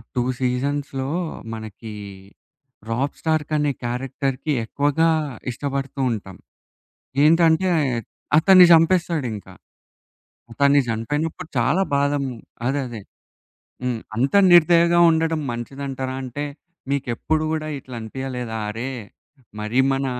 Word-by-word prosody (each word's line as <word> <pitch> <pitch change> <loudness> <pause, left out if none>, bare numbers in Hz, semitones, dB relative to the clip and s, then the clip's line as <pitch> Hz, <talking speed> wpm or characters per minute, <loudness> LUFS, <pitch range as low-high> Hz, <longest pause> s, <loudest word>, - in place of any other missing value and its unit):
Two 125 - +1 0.2
సీజన్స్‌లో 135 +1 -1 0.5
మనకి 110 0 -8 1.0
'Robb 130 +5 -1
Stark' 155 -1 0
అనే 145 -1 +1
క్యారెక్టర్‍కి 135 +4 -2
ఎక్కువగా 145 +6 +1 0.4
ఇష్టపడుతూ 140 +2 -4
ఉంటాం. 95 -4 -6 0.9
ఏంటంటే 165 +3 +4 0.7
అతన్ని 185 +2 +8
చంపేస్తాడింకా. 165 - +1 1.0
అతన్ని 140 +3 +4
చనిపోయినప్పుడు 145 +9 -3
చాలా 125 +11 +2
బాధం 145 0 +1 0.4
అదే 140 +2 0
అదే. 115 -3 -7 0.8
హ్మ్. 125 -3 -1 0.2
అంత 130 +5 0 0.2
నిర్దయగా 170 0 +6
ఉండడం 160 0 +1
మంచిదంటారా? 130 +2 -5
అంటే 130 +3 -5 0.5
మీకెప్పుడు 140 +3 -1
గూడా 155 -1 -2
ఇట్లా 130 -1 -10
అనిపియలేదా? 125 0 -5
అరే! 115 +5 -4 0.7
మరి 110 +4 -1
మన 135 0 -1
140 Hz, 95 wpm, -22 LUFS, 125-155 Hz, 1.0 s, అతన్ని